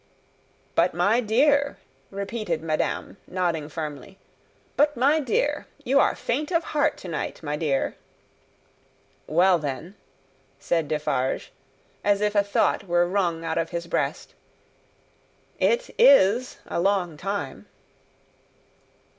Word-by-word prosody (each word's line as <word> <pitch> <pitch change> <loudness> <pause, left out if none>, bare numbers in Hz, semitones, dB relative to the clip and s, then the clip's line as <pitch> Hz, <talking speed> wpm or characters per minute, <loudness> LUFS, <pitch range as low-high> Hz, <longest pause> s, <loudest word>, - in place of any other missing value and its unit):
"But - - +2
my 200 +7 +3
dear!" 280 +6 +2 0.3
repeated 200 -4 -3
madame, 155 -1 -2
nodding 170 -5 -1
firmly; 155 +3 -7 0.6
"but 295 -1 +2
my 280 +6 +4
dear! 290 +2 0 0.2
You 275 +1 +3
are - - +3
faint 290 +5 -2
of 335 -1 +2
heart 300 -2 0
to - - -10
night, 165 0 -4
my 145 -1 -2
dear!" 145 -3 -1 1.3
"Well, 175 +3 +4
then," 150 +5 -5 0.6
said 160 +2 -1
Defarge, 145 -4 -1 0.5
as 205 -1 +3
if 210 0 0
a 205 - +4
thought 200 0 0
were 175 0 +3
wrung 175 -3 -1
out 160 0 -1
of 165 - -2
his 170 -1 -4
breast, - - -2 1.3
"it - - +1
is 250 - +5
a - - -3
long 185 -4 +1
time." 195 +6 -5
190 Hz, 120 wpm, -25 LUFS, 165-235 Hz, 1.3 s, is